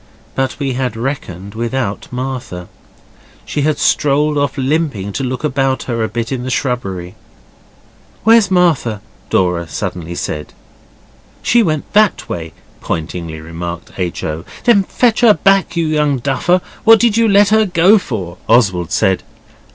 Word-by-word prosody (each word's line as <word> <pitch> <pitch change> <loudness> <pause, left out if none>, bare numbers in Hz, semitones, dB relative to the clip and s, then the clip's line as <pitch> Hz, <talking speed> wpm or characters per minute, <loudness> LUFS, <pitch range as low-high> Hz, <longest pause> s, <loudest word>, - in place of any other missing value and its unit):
But 135 -1 -1
we 140 -2 -2
had 125 -3 -2
reckoned 100 -7 -5
without 115 -2 -3
Martha. 125 -9 -5 0.8
She 145 - -2
had 150 0 +1
strolled 150 +1 +2
off 145 -2 -1
limping 135 -8 -1
to 135 - -2
look 130 +2 -3
about 135 -2 0
her 115 -3 -2
a - - 0
bit 115 +2 -4
in 130 -2 -2
the 130 - -4
shrubbery. 110 -10 -2 1.1
'Where's 225 -2 +5
Martha?' 165 - +2 0.3
Dora 90 -2 +1
suddenly 85 +1 -5
said. 75 -3 -5 0.9
'She 240 - +4
went 155 -8 -2
that 210 -1 +3
way,' 80 -2 -5 0.3
pointingly 80 0 -4
remarked 85 +2 -7
H. 90 -3 -3
O. 80 +1 -3 0.2
'Then 215 -5 +4
fetch 240 +1 +1
her 225 -4 +6
back, 195 -2 +2
you 165 - +1
young 150 -3 +1
duffer! 140 +8 +1 0.2
What 225 0 +7
did 235 -2 +3
you 230 0 +3
let 200 0 +5
her 220 0 +3
go 180 +4 +5
for?' 90 - -6
Oswald 95 -8 +3
said. 95 -1 +2
130 Hz, 150 wpm, -16 LUFS, -, 1.1 s, What